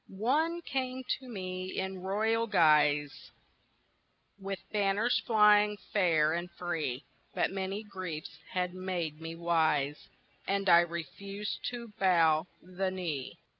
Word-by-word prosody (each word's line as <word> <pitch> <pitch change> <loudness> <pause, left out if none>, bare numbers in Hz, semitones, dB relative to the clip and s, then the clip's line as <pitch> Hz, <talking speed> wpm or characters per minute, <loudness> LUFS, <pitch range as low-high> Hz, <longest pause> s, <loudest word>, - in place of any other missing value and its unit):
ONE 305 - 0
came 260 -2 -3
to 260 +1 -3
me 185 -3 -5
in 190 -1 -3
royal 220 +4 +1
guise 150 -6 +3 1.1
With 195 0 -4
banners 205 +3 +2
flying 210 -2 +5 0.2
fair 160 -6 +3
and 175 +1 -3
free 160 -7 -3 0.3
But - - +1
many 195 +2 -3
griefs 185 -7 -7
had 180 -1 -1
made 175 -4 -4
me 165 0 -6
wise 155 -4 0 0.4
And 195 0 0
I 170 -1 +8
refused 175 +5 -4
to 235 -2 -7
bow 165 -3 +4 0.2
the 185 +2 -2
knee. 165 -8 -4
185 Hz, 120 wpm, -31 LUFS, 165-210 Hz, 1.1 s, I